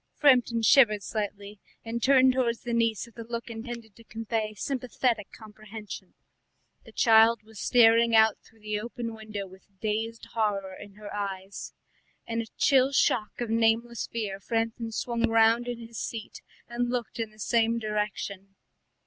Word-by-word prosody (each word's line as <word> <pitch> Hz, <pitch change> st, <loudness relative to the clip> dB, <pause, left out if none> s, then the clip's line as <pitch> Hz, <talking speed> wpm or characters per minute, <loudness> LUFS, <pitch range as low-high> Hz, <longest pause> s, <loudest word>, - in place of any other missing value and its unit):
Framton 245 Hz, -5 st, +4 dB
shivered 215 Hz, -6 st, +5 dB
slightly 205 Hz, -1 st, -5 dB, 0.3 s
and 230 Hz, +1 st, -3 dB
turned 260 Hz, 0 st, +5 dB
towards 235 Hz, -3 st, 0 dB
the 240 Hz, -, -4 dB
niece 230 Hz, -1 st, +1 dB
with 235 Hz, -1 st, -16 dB
a -, -, -4 dB
look 235 Hz, 0 st, -4 dB
intended 230 Hz, -1 st, -8 dB
to 230 Hz, -, -16 dB
convey 220 Hz, -1 st, -3 dB
sympathetic 245 Hz, -3 st, -1 dB
comprehension. 215 Hz, -3 st, -10 dB, 0.7 s
The -, -, -13 dB
child 225 Hz, 0 st, +5 dB
was 220 Hz, -1 st, -13 dB
staring 230 Hz, -1 st, +5 dB
out 220 Hz, -1 st, +5 dB
through 225 Hz, -1 st, -24 dB
the 210 Hz, 0 st, -2 dB
open 235 Hz, +1 st, -5 dB
window 215 Hz, -2 st, -6 dB
with 190 Hz, +1 st, -18 dB
dazed 225 Hz, +2 st, -3 dB
horror 200 Hz, -4 st, -1 dB
in 200 Hz, +1 st, -11 dB
her 210 Hz, -1 st, -9 dB
eyes. 195 Hz, -1 st, -5 dB, 0.5 s
In 230 Hz, 0 st, -2 dB
a 225 Hz, -, -8 dB
chill 270 Hz, -1 st, +4 dB
shock 240 Hz, -4 st, +1 dB
of 235 Hz, -2 st, -2 dB
nameless 230 Hz, +1 st, +1 dB
fear 205 Hz, -4 st, -4 dB
Framton 225 Hz, +2 st, -2 dB
swung 235 Hz, +1 st, -1 dB
round 225 Hz, +1 st, +4 dB
in 245 Hz, -1 st, -3 dB
his 230 Hz, -1 st, -9 dB
seat 225 Hz, -2 st, -6 dB, 0.3 s
and 240 Hz, +1 st, -2 dB
looked 245 Hz, -2 st, -3 dB
in 225 Hz, -1 st, -2 dB
the 215 Hz, -, -22 dB
same 230 Hz, +2 st, +1 dB
direction. 210 Hz, -3 st, -4 dB
225 Hz, 155 wpm, -27 LUFS, 210-235 Hz, 0.7 s, shivered